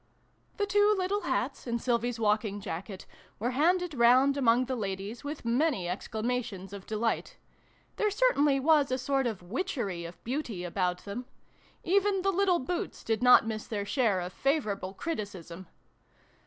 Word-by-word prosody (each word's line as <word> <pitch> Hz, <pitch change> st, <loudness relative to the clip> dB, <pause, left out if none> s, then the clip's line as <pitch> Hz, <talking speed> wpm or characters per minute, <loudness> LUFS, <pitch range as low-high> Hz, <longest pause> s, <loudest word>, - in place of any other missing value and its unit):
The 410 Hz, -, +1 dB
two 410 Hz, +1 st, +4 dB
little 385 Hz, +2 st, 0 dB
hats, -, -, -2 dB
and 235 Hz, 0 st, -1 dB
Sylvie's 240 Hz, -1 st, 0 dB
walking 210 Hz, -1 st, +1 dB
jacket, 190 Hz, 0 st, -6 dB, 0.3 s
were 240 Hz, +4 st, -1 dB
handed 350 Hz, +5 st, +2 dB
round 255 Hz, +2 st, +5 dB
among 250 Hz, -2 st, +3 dB
the 260 Hz, +1 st, -2 dB
ladies, 200 Hz, +2 st, -4 dB
with 290 Hz, -2 st, -6 dB
many 245 Hz, -, +1 dB
exclamations 215 Hz, 0 st, -3 dB
of 200 Hz, -1 st, -9 dB
delight. 225 Hz, -, -2 dB, 0.6 s
There 425 Hz, -, +2 dB
certainly 300 Hz, -, +3 dB
was 295 Hz, 0 st, +4 dB
a 255 Hz, -, +1 dB
sort 270 Hz, 0 st, 0 dB
of 210 Hz, -6 st, -4 dB
witchery 205 Hz, -, -3 dB
of 170 Hz, -, -11 dB
beauty 240 Hz, -7 st, -3 dB
about 180 Hz, 0 st, -2 dB
them. 215 Hz, +5 st, -5 dB, 0.6 s
Even 390 Hz, +1 st, +2 dB
the 390 Hz, -, +3 dB
little 380 Hz, -1 st, +3 dB
boots 340 Hz, +6 st, -4 dB
did 225 Hz, +1 st, -1 dB
not 250 Hz, -2 st, +7 dB
miss 220 Hz, -1 st, -4 dB
their 205 Hz, -2 st, -3 dB
share 210 Hz, -5 st, +1 dB
of 180 Hz, +1 st, -6 dB
favorable 210 Hz, -, -1 dB
criticism. 190 Hz, -, -5 dB
240 Hz, 155 wpm, -29 LUFS, 200-300 Hz, 0.6 s, not